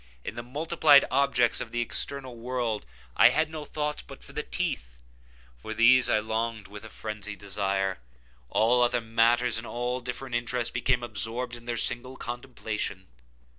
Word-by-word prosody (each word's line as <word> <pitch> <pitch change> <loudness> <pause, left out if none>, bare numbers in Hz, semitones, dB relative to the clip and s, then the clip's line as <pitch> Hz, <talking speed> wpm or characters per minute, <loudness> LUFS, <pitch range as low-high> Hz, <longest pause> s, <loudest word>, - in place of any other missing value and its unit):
In - - -5
the 120 - -5
multiplied 145 +3 +4
objects 130 -3 +2
of - - -5
the 120 - -2
external 130 +2 -2
world 120 - -3 0.3
I - - +8
had 155 0 +1
no 155 -1 -5
thoughts 150 0 -3
but - - -13
for - - -14
the - - -2
teeth. - - -3 0.6
For 110 - -6
these 125 +3 +6
I - - +4
longed 110 0 -2
with 105 +1 -10
a 110 - -9
phrenzied 105 -1 -6
desire. 95 -1 -1 0.5
All 120 +3 +3
other 120 0 +3
matters 115 +1 +2
and 115 - -8
all 120 +1 -2
different 125 +1 -6
interests 120 0 -1
became 120 0 +1
absorbed 120 +3 -1
in 120 0 -13
their 120 -1 -2
single 125 +3 +1
contemplation. 115 -5 -5
120 Hz, 165 wpm, -28 LUFS, 110-125 Hz, 0.6 s, I